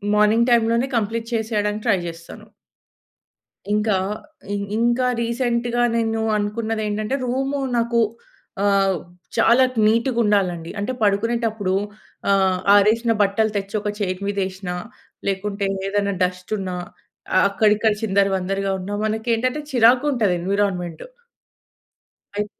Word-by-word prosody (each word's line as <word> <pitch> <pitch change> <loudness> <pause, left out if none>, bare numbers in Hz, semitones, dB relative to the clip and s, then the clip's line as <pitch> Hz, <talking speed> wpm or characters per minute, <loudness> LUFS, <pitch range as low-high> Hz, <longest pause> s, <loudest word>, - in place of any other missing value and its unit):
Morning 215 +3 +4
టైమ్‌లోనే 235 +2 +3
complete 225 +1 -2
చేసేయడానికి 215 -2 -1
try 195 -4 +3
చేస్తాను. 170 0 -10 1.3
ఇంకా 210 0 +2 0.6
ఇం 200 - -2 0.2
ఇంకా 240 +2 +2 0.2
రీసెంట్‌గా 240 0 0 0.2
నేను 225 -1 0 0.2
అనుకున్నదేంటంటే, 215 +1 -2
రూము 270 +3 -1 0.2
నాకు 235 0 +1 0.6
ఆహ్, 195 -2 +3 0.4
చాలా 235 +3 +5 0.2
నీటుగుండాలండి. 210 -7 +1
అంటే, 205 +5 -2
పడుకునేటప్పుడు 215 -1 0 0.6
ఆహ్, 190 -2 +3 0.2
ఆరేసిన 225 +3 +4
బట్టలు 205 +2 +2
తెచ్చొక 205 +1 -2
చైరు 185 -1 -2
మీదేసినా, 190 -2 -3 0.5
లేకుంటే 200 +1 -2 0.2
ఏదైనా 200 0 0
డస్టున్నా 185 +1 -3 0.6
అ - - +6
అక్కడిక్కడ 210 +2 +3
చిందరవందరగా 195 -1 +1
ఉన్నా, 195 +3 -5
మనకేంటంటే 230 +5 0
చిరాకుంటది 245 -3 +3
ఎన్వి‌రాన్‌మెంటు... 180 -3 -1 1.3
అయ్ 210 - 0
210 Hz, 95 wpm, -21 LUFS, 195-230 Hz, 1.3 s, అ